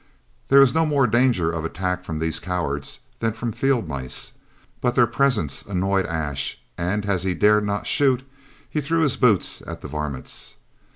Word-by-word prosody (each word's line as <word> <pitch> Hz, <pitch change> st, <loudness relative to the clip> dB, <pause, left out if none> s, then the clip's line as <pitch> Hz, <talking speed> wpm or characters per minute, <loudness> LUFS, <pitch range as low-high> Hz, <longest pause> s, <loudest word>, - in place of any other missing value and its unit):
There 140 Hz, 0 st, +7 dB
was 135 Hz, -2 st, +5 dB
no 160 Hz, +1 st, +3 dB
more 145 Hz, -4 st, +3 dB
danger 120 Hz, -8 st, +2 dB
of 80 Hz, -2 st, -3 dB
attack 90 Hz, +2 st, -2 dB
from 80 Hz, -3 st, -4 dB
these 80 Hz, 0 st, -1 dB
cowards 75 Hz, -6 st, -3 dB, 0.2 s
than 115 Hz, -1 st, 0 dB
from 115 Hz, +1 st, -3 dB
field 130 Hz, -4 st, 0 dB
mice, 70 Hz, -4 st, -3 dB, 0.5 s
but 125 Hz, -1 st, +1 dB
their 120 Hz, -, +6 dB
presence 120 Hz, -, +1 dB
annoyed 95 Hz, 0 st, 0 dB
Ash, 75 Hz, -4 st, -2 dB, 0.2 s
and 100 Hz, +4 st, -1 dB
as 100 Hz, -3 st, 0 dB
he 95 Hz, -1 st, -1 dB
dared 105 Hz, +3 st, +4 dB
not 100 Hz, 0 st, -2 dB
shoot, 130 Hz, -3 st, +2 dB, 0.4 s
he 150 Hz, -, -2 dB
threw 165 Hz, +3 st, 0 dB
his 145 Hz, -6 st, +2 dB
boots 115 Hz, -8 st, +2 dB
at -, -, -7 dB
the -, -, -7 dB
varmints. 75 Hz, -2 st, -4 dB
100 Hz, 175 wpm, -23 LUFS, 85-125 Hz, 0.5 s, There